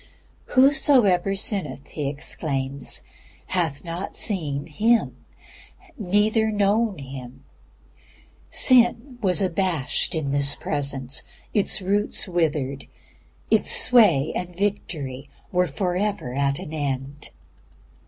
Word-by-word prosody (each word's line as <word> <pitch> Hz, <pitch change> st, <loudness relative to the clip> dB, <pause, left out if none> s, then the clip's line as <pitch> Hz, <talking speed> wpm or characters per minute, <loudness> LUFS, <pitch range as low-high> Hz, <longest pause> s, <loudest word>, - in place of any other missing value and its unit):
"Whosoever 255 Hz, -9 st, +4 dB
sinneth," 180 Hz, -9 st, -3 dB
he 150 Hz, -3 st, -4 dB
exclaims, 140 Hz, -2 st, -4 dB, 0.4 s
"hath 170 Hz, -5 st, -2 dB
not 170 Hz, +3 st, -5 dB
seen 150 Hz, -9 st, -1 dB
Him, 220 Hz, +9 st, +1 dB, 0.8 s
neither 215 Hz, +1 st, +1 dB
known 205 Hz, 0 st, +1 dB
Him." 130 Hz, -1 st, -10 dB, 1.1 s
Sin 245 Hz, 0 st, +3 dB
was 195 Hz, -1 st, +2 dB
abashed 175 Hz, -6 st, 0 dB
in 145 Hz, -4 st, -2 dB
this 140 Hz, 0 st, +2 dB
Presence. 140 Hz, -2 st, -1 dB, 0.3 s
Its 205 Hz, -1 st, +1 dB
roots 205 Hz, +3 st, 0 dB
withered. 150 Hz, -6 st, -1 dB, 0.6 s
Its -, -, +3 dB
sway 225 Hz, -, +5 dB
and 180 Hz, -1 st, -5 dB
victory 150 Hz, -9 st, -3 dB, 0.2 s
were 180 Hz, 0 st, +2 dB
forever 185 Hz, -8 st, -2 dB
at 140 Hz, +1 st, 0 dB
an 155 Hz, -, -8 dB
end. 140 Hz, -1 st, -4 dB
175 Hz, 95 wpm, -23 LUFS, 140-205 Hz, 1.1 s, sway